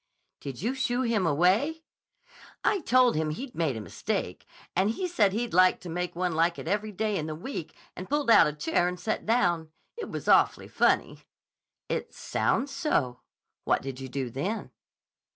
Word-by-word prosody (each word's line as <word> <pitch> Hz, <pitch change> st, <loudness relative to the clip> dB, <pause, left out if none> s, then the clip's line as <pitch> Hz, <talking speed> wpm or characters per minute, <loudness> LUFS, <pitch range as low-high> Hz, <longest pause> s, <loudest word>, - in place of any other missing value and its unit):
"Did 140 Hz, +3 st, -7 dB
you 240 Hz, +4 st, 0 dB
shoo 260 Hz, -1 st, 0 dB
him 220 Hz, -7 st, +1 dB
away?" 195 Hz, -, +2 dB, 0.8 s
"I 410 Hz, -, +2 dB
told 255 Hz, -5 st, +4 dB
him 155 Hz, 0 st, 0 dB
he'd 245 Hz, -, -6 dB
made 155 Hz, -8 st, -1 dB
a -, -, -5 dB
mistake, -, -, -4 dB, 0.3 s
and 190 Hz, +3 st, +3 dB
he 365 Hz, +12 st, -2 dB
said 215 Hz, -, +3 dB
he'd 230 Hz, +3 st, -2 dB
like 185 Hz, +1 st, +5 dB
to 180 Hz, -, -8 dB
make 180 Hz, +1 st, -3 dB
one 180 Hz, 0 st, -1 dB
like 170 Hz, +2 st, +2 dB
it -, -, -7 dB
every 210 Hz, +1 st, -1 dB
day 210 Hz, +1 st, -1 dB
in 155 Hz, -, -3 dB
the 155 Hz, -, -4 dB
week 170 Hz, -, -6 dB, 0.2 s
and 185 Hz, -, -8 dB
pulled 290 Hz, -4 st, +2 dB
out -, -, +8 dB
a 150 Hz, -, -2 dB
chair 160 Hz, +4 st, +1 dB
and 180 Hz, 0 st, -4 dB
sat 220 Hz, -, -3 dB
down. 175 Hz, -8 st, +2 dB, 0.3 s
It 465 Hz, -, -6 dB
was -, -, -6 dB
awfully -, -, +4 dB
funny." -, -, +1 dB, 0.7 s
"It -, -, -3 dB
sounds 275 Hz, +1 st, 0 dB
so. 130 Hz, -, 0 dB, 0.4 s
What -, -, +1 dB
did 135 Hz, -1 st, -6 dB
you 135 Hz, -1 st, -7 dB
do 130 Hz, -1 st, -3 dB
then?" 190 Hz, -, -3 dB
185 Hz, 185 wpm, -28 LUFS, 160-240 Hz, 0.8 s, out